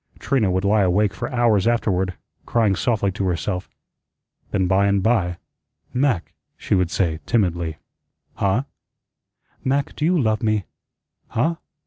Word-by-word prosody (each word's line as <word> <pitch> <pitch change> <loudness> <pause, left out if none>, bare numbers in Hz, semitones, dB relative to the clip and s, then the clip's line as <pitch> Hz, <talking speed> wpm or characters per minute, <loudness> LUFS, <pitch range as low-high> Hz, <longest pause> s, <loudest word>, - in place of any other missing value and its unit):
Trina 130 -8 +1
would 95 +2 0
lie 105 +1 +4
awake 100 +2 +2
for 95 - -5
hours 115 -5 +3
afterward, 95 -6 +1 0.3
crying 110 -4 +2
softly 100 -1 +1
to 95 +1 -3
herself. 90 +2 -2 0.8
Then, 95 -2 +1
by 95 +2 +3
and 100 -1 +2
by, 95 -6 +1 0.6
"Mac," 125 -9 0 0.2
she - - -2
would 90 -3 +2
say 85 -4 0
timidly. 85 -8 0 0.6
"Huh?" 100 +6 +1 1.0
"Mac, 140 +1 0
do - - -4
you 175 +2 +3
love 110 -5 +1
me?" 110 -3 +1 0.6
"Huh? 160 +8 0
100 Hz, 135 wpm, -22 LUFS, 95-115 Hz, 1.0 s, lie